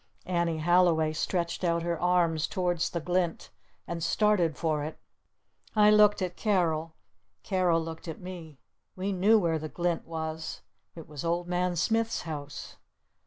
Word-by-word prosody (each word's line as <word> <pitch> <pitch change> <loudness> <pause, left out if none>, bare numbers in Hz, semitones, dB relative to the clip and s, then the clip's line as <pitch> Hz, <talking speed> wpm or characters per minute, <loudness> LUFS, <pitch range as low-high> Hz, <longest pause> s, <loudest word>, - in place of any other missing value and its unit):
Annie 170 -2 0
Halliway 165 -1 +3
stretched 170 +3 -2
out 170 -1 +1
her 170 -1 -2
arms 175 -3 +2
towards 175 -2 0
the 170 - -3
glint. 175 0 -1 0.3
And 170 -1 -4
started 180 -4 +2
for 155 -3 0
it. 155 - -6 0.8
I 210 0 +6
looked 210 -2 +5
at 180 -1 -3
Carol. 165 -6 0 0.5
Carol 180 -3 +2
looked 165 +1 -8
at 160 - -6
me. 175 -5 -9 0.4
We 190 +2 -2
knew 200 +4 +4
where 165 -5 +1
the 155 0 -6
glint 175 0 -2
was. 160 -1 -5 0.3
It 165 -2 -10
was 150 -2 -7
Old 170 +1 -1
Man 180 0 0
Smith's 225 +6 0
house. 145 -3 -7
170 Hz, 150 wpm, -28 LUFS, 160-180 Hz, 0.8 s, I